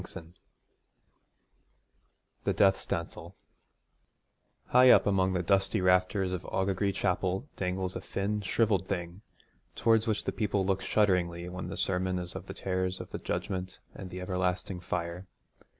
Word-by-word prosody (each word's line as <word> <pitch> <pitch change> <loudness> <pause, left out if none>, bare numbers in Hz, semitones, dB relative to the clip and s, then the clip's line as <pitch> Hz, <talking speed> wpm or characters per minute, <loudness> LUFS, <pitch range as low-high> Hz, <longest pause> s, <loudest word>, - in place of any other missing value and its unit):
X - - -8 2.3
THE - - +1
DEATH 95 -1 +4
SPANCEL 85 +2 -5 1.3
High 125 +1 +7
up - - +7
among 95 -2 +2
the 90 -1 0
dusty 100 +3 +2
rafters 90 +1 +2
of 90 -1 -2
Aughagree 95 +1 0
Chapel 95 +5 -1
dangles 95 0 -2
a - - -4
thin 105 +2 -2
shrivelled 100 -2 +1
thing, 90 0 -4 0.5
towards 115 0 +3
which 110 -2 0
the - - -1
people 105 -3 0
look 95 0 0
shudderingly 90 -4 +1
when 90 -1 -6
the 95 - -6
sermon 95 0 0
is 90 -1 -4
of - - -7
the - - -7
terrors 95 -1 -2
of - - -8
the - - -4
Judgment 95 -1 -3 0.2
and 95 - -8
the 90 +1 -7
everlasting 90 0 -2
fire. 85 0 -4
95 Hz, 145 wpm, -30 LUFS, 90-100 Hz, 2.3 s, High